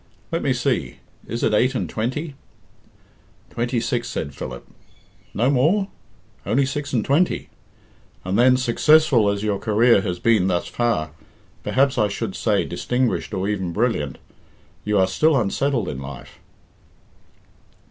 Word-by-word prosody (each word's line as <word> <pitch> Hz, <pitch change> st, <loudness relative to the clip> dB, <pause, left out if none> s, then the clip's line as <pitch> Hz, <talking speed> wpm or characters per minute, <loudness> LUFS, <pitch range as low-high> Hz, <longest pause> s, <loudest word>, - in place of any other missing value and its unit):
Let -, -, -1 dB
me -, -, 0 dB
see, -, -, -1 dB, 0.3 s
is 115 Hz, +2 st, -4 dB
it 110 Hz, -, +2 dB
eight 125 Hz, +5 st, +2 dB
and -, -, -1 dB
twenty?" 130 Hz, +8 st, -3 dB, 1.2 s
"Twenty 120 Hz, +1 st, -1 dB
six," 115 Hz, -, -2 dB
said 70 Hz, -, -4 dB
Philip. 65 Hz, -3 st, -8 dB, 0.6 s
"No 120 Hz, +5 st, +1 dB
more? 170 Hz, +10 st, +2 dB, 0.5 s
Only 120 Hz, +9 st, +1 dB
six 145 Hz, +1 st, -4 dB
and 115 Hz, -5 st, 0 dB
twenty? 155 Hz, +6 st, +1 dB, 0.8 s
And 95 Hz, +1 st, -1 dB
then, 125 Hz, +2 st, +5 dB
successful 130 Hz, -2 st, +4 dB
as 100 Hz, 0 st, -2 dB
your 105 Hz, -2 st, 0 dB
career 110 Hz, +1 st, +4 dB
has 90 Hz, -3 st, -3 dB
been 105 Hz, -1 st, +2 dB
thus 90 Hz, -2 st, 0 dB
far 115 Hz, -11 st, -1 dB, 0.5 s
perhaps 135 Hz, -1 st, +1 dB
I 105 Hz, -, +3 dB
should 100 Hz, -, -4 dB
say -, -, +1 dB
distinguished 125 Hz, -1 st, -1 dB
or 95 Hz, -1 st, -2 dB
even 95 Hz, -4 st, -2 dB
brilliant 105 Hz, -, -1 dB, 0.7 s
you 105 Hz, 0 st, 0 dB
are 95 Hz, -, +5 dB
still 155 Hz, +8 st, +2 dB
unsettled 120 Hz, +1 st, 0 dB
in 65 Hz, -, -5 dB
life." 65 Hz, -1 st, -10 dB
115 Hz, 140 wpm, -22 LUFS, 100-130 Hz, 1.2 s, then